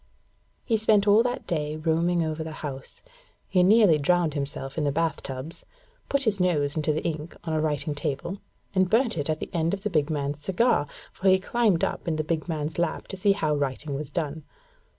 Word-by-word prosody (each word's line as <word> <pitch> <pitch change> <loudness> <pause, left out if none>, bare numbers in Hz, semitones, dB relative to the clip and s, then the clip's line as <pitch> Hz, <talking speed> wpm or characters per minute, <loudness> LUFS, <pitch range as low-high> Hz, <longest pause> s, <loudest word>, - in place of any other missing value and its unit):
He 225 - +2
spent 215 -1 +3
all 205 +2 +7
that 245 +1 -2
day 150 -2 -2
roaming 165 +2 +1
over 160 0 -2
the 160 0 -6
house. 135 -2 -7 0.4
He 180 - +3
nearly 195 -4 +6
drowned 170 +1 +2
himself 140 -2 -4
in 155 - -1
the 145 - +1
bath 165 +2 0
tubs, 135 +5 -6 0.5
put 280 0 +1
his 215 -5 +1
nose 150 -6 +1
into 155 -1 +1
the 155 - -2
ink 160 0 -4
on 160 - -3
a 155 - +1
writing 150 -1 -1
table, 145 +6 -3 0.3
and 185 -2 +2
burnt 230 +3 +2
it 145 -1 -2
on 155 - +2
the - - -6
end 170 +2 +1
of 195 - -13
the 210 - -1
big 150 -2 +1
man's 145 -1 -2
cigar, 190 -1 +2 0.3
for 190 - +1
he 190 - +6
climbed 205 -2 +1
up - - -2
in 165 - +1
the 155 - -1
big 155 +1 -2
man's 155 0 -3
lap 170 -1 -1
to - - -4
see 200 +2 +3
how 155 -6 0
writing 140 +1 -2
was 140 0 -4
done. 160 -3 -3
160 Hz, 210 wpm, -26 LUFS, 150-185 Hz, 0.5 s, all